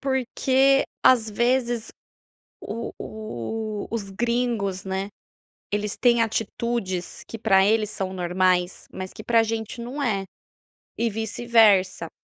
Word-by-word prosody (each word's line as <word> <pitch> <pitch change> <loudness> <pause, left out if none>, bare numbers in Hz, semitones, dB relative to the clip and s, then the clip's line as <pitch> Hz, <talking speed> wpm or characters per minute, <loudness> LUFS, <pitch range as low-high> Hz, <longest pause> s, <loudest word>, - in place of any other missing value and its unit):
porque, 265 +1 +2 0.2
às 230 -4 +5
vezes, 240 0 +1 0.7
o 230 +3 -5
o 215 - -5
os 210 -4 -3
gringos, 230 -3 -1
né, 190 +1 -3 0.6
eles 205 0 -2
têm 235 -2 +4
atitudes 220 -4 -2
que 225 - -7
para 195 -3 +4
eles 215 0 +2
são 190 -2 -3
normais 180 0 0
mas 185 0 -7
que - - -10
pra 230 0 +4
gente 225 +1 -4
não 265 +5 -5
é, 200 -6 0 0.7
e 230 0 +1
vice-versa. 220 -5 +3
220 Hz, 120 wpm, -24 LUFS, 195-235 Hz, 0.7 s, às